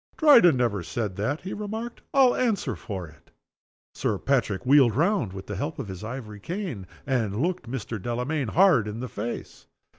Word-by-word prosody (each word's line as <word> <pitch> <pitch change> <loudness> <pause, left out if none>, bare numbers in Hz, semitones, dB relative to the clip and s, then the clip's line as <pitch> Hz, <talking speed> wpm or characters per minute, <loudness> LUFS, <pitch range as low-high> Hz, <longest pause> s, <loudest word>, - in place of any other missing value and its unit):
"Dryden 240 - +7
never 115 -6 +1
said 105 +2 -3
that," 135 +10 -1
he 185 - -5
remarked, 220 +3 -5
"I'll 265 -3 +5
answer 230 -6 0
for 95 -6 -6
it." 75 - -19 0.6
Sir 105 - -1
Patrick 120 -4 0
wheeled 130 -4 +5
round 165 - +1
with 95 0 -8
the 105 - -5
help 145 +10 -3
of 100 - -5
his 95 +1 -7
ivory 110 -3 -7
cane, 165 - -5 0.2
and 115 -6 0
looked 170 -4 -1
Mr. 115 -4 -4
Delamayn 125 +5 -2
hard 155 - +4
in 105 +2 -5
the 125 - -4
face. 115 +1 -6
125 Hz, 175 wpm, -26 LUFS, 105-175 Hz, 0.6 s, Dryden